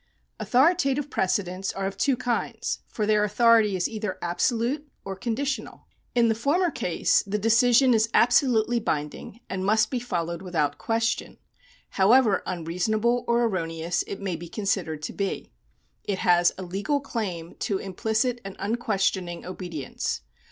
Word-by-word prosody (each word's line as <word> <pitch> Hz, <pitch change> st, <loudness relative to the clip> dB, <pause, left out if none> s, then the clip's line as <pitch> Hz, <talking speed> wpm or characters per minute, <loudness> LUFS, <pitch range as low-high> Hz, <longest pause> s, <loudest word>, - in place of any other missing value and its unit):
Avithoritative 280 Hz, 0 st, +2 dB
precedents 185 Hz, 0 st, -1 dB
are 195 Hz, -, -3 dB
of 195 Hz, 0 st, -3 dB
two 260 Hz, +5 st, +1 dB
kinds, 240 Hz, -1 st, -2 dB
for 215 Hz, -, -2 dB
their 210 Hz, 0 st, +3 dB
autho 230 Hz, +2 st, +5 dB
rity 210 Hz, -3 st, -1 dB
is 180 Hz, -, 0 dB
either 215 Hz, -4 st, -4 dB
absolute 235 Hz, -, -1 dB, 0.2 s
or 195 Hz, -1 st, -4 dB
conditional. 250 Hz, +7 st, -3 dB, 0.3 s
In 235 Hz, -1 st, +4 dB
the 225 Hz, -, +3 dB
former 305 Hz, +10 st, +1 dB
case 180 Hz, -, +1 dB
the 205 Hz, +2 st, -1 dB
decision 240 Hz, +4 st, +4 dB
is 220 Hz, 0 st, +2 dB
absolutely 240 Hz, -2 st, +3 dB
binding 150 Hz, +5 st, -4 dB
and 185 Hz, 0 st, -3 dB
must 215 Hz, +2 st, +2 dB
be 255 Hz, -, 0 dB
followed 170 Hz, -7 st, -3 dB
without 155 Hz, -6 st, -1 dB
question, 230 Hz, 0 st, -1 dB, 0.5 s
however 215 Hz, +1 st, +4 dB
unreasonable 210 Hz, +8 st, 0 dB
or 235 Hz, 0 st, +3 dB
erroneous 170 Hz, -5 st, -1 dB
it 200 Hz, -, -5 dB
may 190 Hz, -3 st, -3 dB
be 170 Hz, +1 st, -8 dB
considered 185 Hz, -7 st, -2 dB
to -, -, -4 dB
be. 200 Hz, -1 st, -3 dB, 0.5 s
It 200 Hz, -, -2 dB
has 175 Hz, -1 st, +4 dB
a 190 Hz, -, -5 dB
legal 200 Hz, +11 st, -1 dB
claim 195 Hz, -11 st, -4 dB
to 200 Hz, -, -1 dB
implicit 220 Hz, +6 st, -1 dB
and 195 Hz, -1 st, -7 dB
unquestioning 195 Hz, -5 st, -1 dB
obedience. 175 Hz, -6 st, -4 dB
210 Hz, 145 wpm, -26 LUFS, 185-235 Hz, 0.5 s, autho